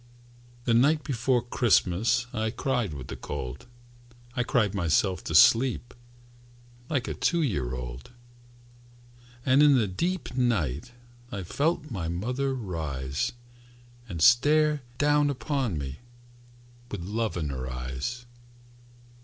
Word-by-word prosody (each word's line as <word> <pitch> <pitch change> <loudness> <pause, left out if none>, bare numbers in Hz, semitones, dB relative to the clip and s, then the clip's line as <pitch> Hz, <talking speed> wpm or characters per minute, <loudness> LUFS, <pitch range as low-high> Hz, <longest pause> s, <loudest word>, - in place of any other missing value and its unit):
The 120 - +1
night 145 +6 +4
before 125 -1 +1
Christmas 115 -1 +2
I 110 0 -1
cried 120 -3 -1
with 65 -2 -7
the - - -7
cold, 65 - -6 0.7
I 125 - +1
cried 110 -4 +1
myself 95 +1 +1
to 80 - -2
sleep 120 +7 +5 1.0
Like 135 -5 -1
a - - -2
two 170 -1 +1
year 70 - -1
old. 60 0 -7 1.4
And 135 +1 +5
in 145 -2 +7
the 115 - +3
deep 170 - -2
night 105 - 0 0.4
I 100 -4 -4
felt 150 - -1
my 90 -7 -3
mother 125 +11 -1
rise, 75 - -3 0.8
And 85 -4 -2
stare 150 +4 +5 0.2
down 145 +1 +3
upon 135 - -1
me 70 -1 -5 0.9
With 100 -6 -5
love 110 +2 -2
in 75 -4 -2
her 65 -1 -4
eyes. 65 - -4
115 Hz, 120 wpm, -27 LUFS, 80-130 Hz, 1.4 s, in